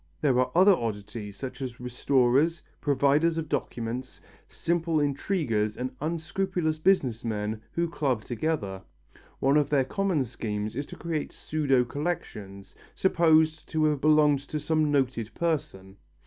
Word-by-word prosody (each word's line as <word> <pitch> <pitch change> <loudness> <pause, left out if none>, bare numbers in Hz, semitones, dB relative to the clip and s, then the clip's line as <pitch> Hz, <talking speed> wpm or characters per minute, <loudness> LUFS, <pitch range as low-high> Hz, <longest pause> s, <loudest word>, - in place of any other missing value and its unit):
There 130 -4 +2
are 130 - +2
other 190 +3 +7
oddities, 105 - -5
such 135 0 -7
as 125 -3 -5
restorers, 130 +5 +2 0.2
providers 145 +3 +2
of 160 -1 -2
documents, 120 -1 -4 0.3
simple 165 -2 0
intriguers 140 - 0
and 130 +1 -4
unscrupulous 165 +1 -1
business 145 - +2
men 110 -1 -3
who 170 0 0
club 135 -9 -1
together. 115 -7 -2 0.6
One 135 +2 +3
of 150 - +2
their 140 -3 +3
common 185 -3 0
schemes 105 -2 -4
is 140 +2 -3
to - - -9
create 165 -3 -3
pseudo 140 -5 +1
collections, 110 - -5 0.2
supposed 160 -3 +3
to 155 -1 +1
have 150 -3 +1
belonged 150 -2 +5
to 155 - -3
some 155 0 +1
noted 125 -5 0
person. 100 - -2
140 Hz, 135 wpm, -27 LUFS, 120-160 Hz, 0.6 s, other